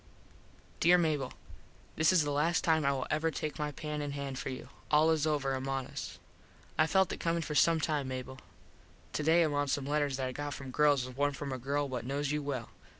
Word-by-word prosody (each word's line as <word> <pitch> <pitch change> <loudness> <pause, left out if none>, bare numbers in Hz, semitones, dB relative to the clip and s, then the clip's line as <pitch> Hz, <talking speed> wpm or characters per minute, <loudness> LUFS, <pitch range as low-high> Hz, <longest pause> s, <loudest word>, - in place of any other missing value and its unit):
_ - - -28
Dere 175 +2 +6
Mable: 155 -6 0 0.6
This 160 +2 +4
is 180 -4 +4
the 145 - -1
last 155 +4 +1
time 160 -2 +3
I 140 - +4
will 135 -2 -2
ever 155 +1 +1
take 155 0 -4
my 150 0 -1
pen 150 +1 -4
in 145 -1 -3
hand 140 -2 -4
for - - -4
you. 130 - -7 0.2
All 155 +2 +5
is 160 -1 +2
over 140 -3 0
among 135 0 -2
us. - - -7 0.6
I 155 - +3
felt 190 +2 +3
it - - -6
comin 165 0 0
for 150 - -4
some 165 +2 +4
time 150 -3 0
Mable. 130 0 -5 0.7
Today 160 +3 +4
among 145 -2 0
some 135 0 -1
letters 145 -2 0
that 130 -1 -1
I - - -3
got 145 +1 -4
from 135 -1 -7
girls 145 -2 +3
was 130 -1 -9
one 145 +1 +1
from 140 0 -5
a 130 - -4
girl 140 +3 -1
what 125 -3 -4
knos 140 +3 -2
you 150 0 0
well. 135 -5 -4
145 Hz, 225 wpm, -32 LUFS, 135-155 Hz, 0.7 s, Dere